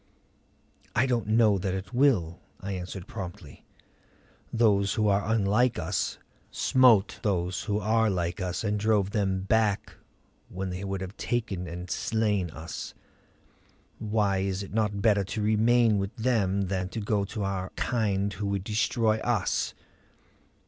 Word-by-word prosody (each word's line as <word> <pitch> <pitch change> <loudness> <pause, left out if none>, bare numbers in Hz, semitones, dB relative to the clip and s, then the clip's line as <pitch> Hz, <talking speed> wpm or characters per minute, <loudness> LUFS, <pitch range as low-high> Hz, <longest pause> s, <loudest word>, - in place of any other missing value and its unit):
"I 120 - +4
don't 120 -5 0
know 110 -2 +4
that 95 0 -2
it 95 +6 -6
will," 105 - +2 0.2
I 100 - -5
answered 90 0 -5
promptly. 90 -6 -8 0.9
"Those 100 -4 +3
who 110 -2 +2
are 100 +2 +1
unlike 115 +3 +2
us - - -2 0.3
smote 120 -6 +4
those 90 -3 -1
who 105 -2 0
are 110 +1 +2
like 85 -1 -2
us 90 +1 -2
and 105 -1 0
drove 105 -2 +2
them 95 -3 0
back 105 0 +1 0.6
when 95 0 -4
they 90 +2 -5
would 95 -1 -3
have 95 +2 -6
taken 105 -7 -2
and 90 +2 -6
slain 105 -2 0
us. 80 +1 -7 1.0
Why 105 -3 +1
is 95 0 -2
it 100 - -10
not 105 -2 0
better 105 -3 +4
to 100 +3 -4
remain 110 0 +3
with 100 +1 -4
them 105 -5 +1
than 95 -1 -2
to 115 - -5
go 105 -1 0
to 105 +1 -4
our 95 -1 -2
kind 100 -4 0
who 100 +3 -4
would 100 -2 -1
destroy 110 +1 +1
us?" 110 -5 0
100 Hz, 150 wpm, -27 LUFS, 95-110 Hz, 1.0 s, I